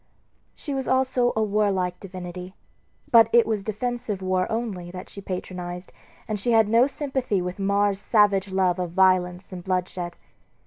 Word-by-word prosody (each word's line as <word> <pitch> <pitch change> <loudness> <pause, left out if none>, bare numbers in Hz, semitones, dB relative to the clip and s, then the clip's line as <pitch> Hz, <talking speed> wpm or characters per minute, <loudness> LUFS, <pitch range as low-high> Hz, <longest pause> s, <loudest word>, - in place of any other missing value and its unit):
She 290 - -5
was 265 -1 -2
also 260 -2 +2
a 220 - +2
warlike 200 -4 0
divinity; 180 0 -8 0.6
but 230 -2 +7
it 235 -1 +6
was 215 -3 -1
defensive 220 -1 -3
war 185 -1 0
only 215 -6 -3
that 180 +1 -9
she 200 - -9
patronized, 180 -1 -6 0.3
and 215 -1 -2
she 235 +4 0
had 225 -2 +5
no 230 +4 +4
sympathy 265 -7 -2
with 180 +2 -4
Mars's 200 0 +1
savage 205 -3 +3
love 185 -1 +1
of 175 -2 -3
violence 185 0 +2
and 180 -1 -7
bloodshed. 180 -2 -2
195 Hz, 155 wpm, -24 LUFS, 180-225 Hz, 0.6 s, but